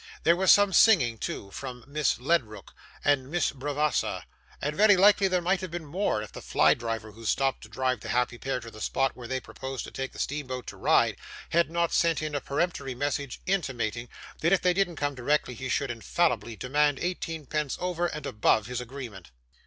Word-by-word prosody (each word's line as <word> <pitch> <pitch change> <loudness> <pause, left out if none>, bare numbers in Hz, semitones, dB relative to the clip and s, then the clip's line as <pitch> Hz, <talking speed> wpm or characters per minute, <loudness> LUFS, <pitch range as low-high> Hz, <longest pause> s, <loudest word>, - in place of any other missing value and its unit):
There 170 - +5
was 190 +1 +5
some 205 -1 +5
singing, 130 - +5
too, 100 - -5
from 125 +1 -7
Miss 145 -4 0
Ledrook 120 - -1 0.3
and 135 -2 +2
Miss 175 -1 +1
Bravassa, 145 +2 -1 0.4
and 150 +1 -2
very 205 0 +6
likely 200 +1 +6
there 180 -2 0
might 185 +1 +1
have 185 - -5
been 170 -1 -5
more, 150 - -1
if 105 - -10
the - - -9
fly - - +4
driver, 115 -2 -4
who 115 +2 -13
stopped 135 +4 +1
to - - -12
drive 130 -1 -1
the - - -8
happy 125 -1 0
pair 135 -1 -2
to 115 0 -10
the 110 - -11
spot 135 +1 +1
where 120 -2 -9
they 130 +1 -1
proposed 130 +3 -6
to - - -9
take 135 0 -5
steamboat 130 -3 -3
to - - -8
Ryde, - - +3 0.3
had 170 0 +3
not 170 0 0
sent 165 -2 +3
in 155 -1 -3
a 145 - -1
peremptory 140 -3 -2
message 140 0 -3
intimating, 120 - -1 0.3
that 170 - +2
if 195 - +3
they 180 -1 +4
didn't 180 -2 0
come 145 -1 -1
directly 135 +1 0
he 130 +2 -6
should 135 0 0
infallibly 120 0 0
demand 145 +4 +1
eighteen 165 -3 -3
pence 150 0 -2
over 175 -1 -1
and 150 -3 -6
above 105 -2 +2
his 125 +1 -4
agreement. 120 - -8
140 Hz, 200 wpm, -28 LUFS, 125-170 Hz, 0.4 s, very